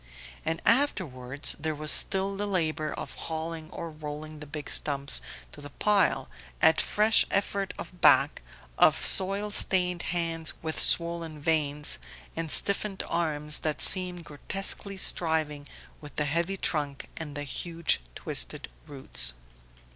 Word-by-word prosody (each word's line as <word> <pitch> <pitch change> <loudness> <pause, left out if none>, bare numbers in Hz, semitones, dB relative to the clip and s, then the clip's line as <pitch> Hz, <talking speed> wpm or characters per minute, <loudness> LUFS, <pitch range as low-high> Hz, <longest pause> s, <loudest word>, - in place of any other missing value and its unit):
And 160 +1 -3
afterwards 145 - +1
there 155 0 -3
was 150 0 0
still 195 0 +4
the 205 +1 -3
labour 155 -5 -1
of - - -7
hauling 160 0 -6
or 165 -1 -8
rolling 155 0 -9
the 150 - -10
big 145 0 -8
stumps 140 -1 0 0.3
to 145 - -12
the 145 - -9
pile 205 +6 +1 0.3
at 160 - +4
fresh 215 +1 +3
effort 200 -1 -2
of 180 - -10
back, - - +4 0.4
of - - +3
soil 195 +2 +1
stained 180 -3 +1
hands 165 -2 -2
with 160 -1 -1
swollen 170 -2 0
veins, 150 -1 +1 0.4
and 165 -1 -4
stiffened 200 0 +3
arms 150 -3 -1
that 155 -1 -1
seemed 180 -2 +7
grotesquely 195 +6 -1
striving 155 -5 0 0.3
with 145 -2 -12
the 150 - -1
heavy 170 +6 -2
trunk 145 -6 -3
and 150 -3 -7
the 145 - -4
huge 165 - -3
twisted - - -3 0.2
roots. - - +1
160 Hz, 135 wpm, -27 LUFS, 150-185 Hz, 0.4 s, seemed